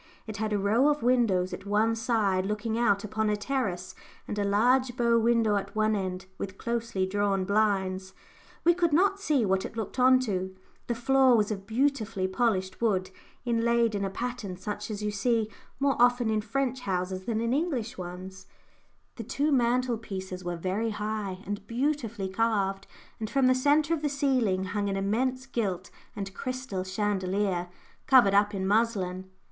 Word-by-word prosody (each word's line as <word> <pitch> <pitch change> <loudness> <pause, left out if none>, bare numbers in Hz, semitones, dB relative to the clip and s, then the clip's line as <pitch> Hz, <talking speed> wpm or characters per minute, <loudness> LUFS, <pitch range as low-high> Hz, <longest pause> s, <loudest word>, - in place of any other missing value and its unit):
It 215 -1 -6
had 215 +1 -2
a 210 - +2
row 215 +7 +3
of 295 -4 0
windows 230 -8 +2
at - - -7
one 215 +2 +2
side 210 -5 +1
looking 210 +2 -2
out 205 -4 +2
upon 215 +1 -1
a 210 - +2
terrace, 205 -6 -2 0.3
and 210 - -3
a - - +1
large 245 +5 +2
bow 235 -1 +3
window 225 -2 +3
at 200 - -5
one 215 0 +2
end, 185 -1 -3
with 190 -1 -5
closely 230 -5 -2
drawn 195 0 0
blinds 190 -2 0 0.5
we 345 - +5
could 340 -3 +1
not 390 +5 +3
see 295 - +1
what 190 -1 +1
it - - -7
looked 225 +3 -4
on 255 0 +6
to; 190 -5 -3 0.3
the 235 - -1
floor 260 +1 +4
was 210 0 +1
of 195 -2 -5
beautifully 225 -5 0
polished 190 -2 -1
wood, 190 -5 +1 0.3
inlaid 235 -1 +2
in 200 -1 -1
a 195 - -1
pattern 230 -3 -5
such 210 +3 -5
as 210 -1 -4
you 210 - 0
see 220 +1 0 0.3
more 275 0 +2
often 245 -2 +4
in 215 -1 +1
French 260 +3 -1
houses 185 -3 -3
than 225 -2 -1
in 230 +1 0
English 265 -6 -1
ones; 185 0 -8 0.7
the 230 - -5
two 285 +7 0
mantelpieces 230 -7 -1
were 175 -1 -3
very 190 +6 -1
high, 210 -3 -4
and 205 0 -5
beautifully 235 -5 -1
carved, 195 -1 0 0.3
and 220 -1 -4
from 275 +1 +2
the 255 - +5
centre 290 +4 +2
of 320 - -1
the 295 - 0
ceiling 255 -9 +1
hung 200 +2 -2
an 195 - -1
immense 250 +7 0
gilt 200 -7 -3 0.2
and 195 -2 -5
crystal 255 -6 -4
chandelier, 190 -2 -1 0.4
covered 245 -7 +6
up 205 +1 +3
in 190 -1 -2
muslin. 190 -3 0
215 Hz, 175 wpm, -28 LUFS, 195-245 Hz, 0.7 s, on